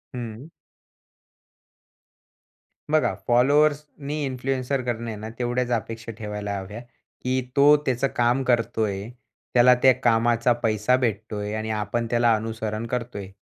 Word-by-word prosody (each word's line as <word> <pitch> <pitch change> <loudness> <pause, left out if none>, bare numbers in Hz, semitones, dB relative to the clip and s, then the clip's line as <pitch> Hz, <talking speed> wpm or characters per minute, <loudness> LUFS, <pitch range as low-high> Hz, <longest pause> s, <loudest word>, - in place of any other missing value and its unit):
हं. 120 +2 -7 2.4
बघा, 155 0 +3
फॉलोवर्सनी 145 +3 +2
इन्फ्लुएन्सर 130 0 -2
कडून 120 -1 -3
आहे 110 - -4
ना, 110 +1 -7
तेवढ्याच 125 0 -1
अपेक्षा 115 0 -3
ठेवायला 105 -2 -4
हव्या, 100 +3 -7 0.4
की 130 +1 0
तो 145 +1 +7
त्याचं 130 +1 +1
काम 120 +2 +2
करतोय. 115 -4 0 0.4
त्याला 125 +1 +6
त्या 130 -1 +8
कामाचा 120 +1 +3
पैसा 110 +2 +2
भेटतोय 110 -3 -2
आणि 110 0 -3
आपण 110 +2 -2
त्याला 120 -1 +3
अनुसरण 110 0 -4
करतोय. 115 -5 -4
120 Hz, 115 wpm, -24 LUFS, 110-125 Hz, 2.4 s, त्या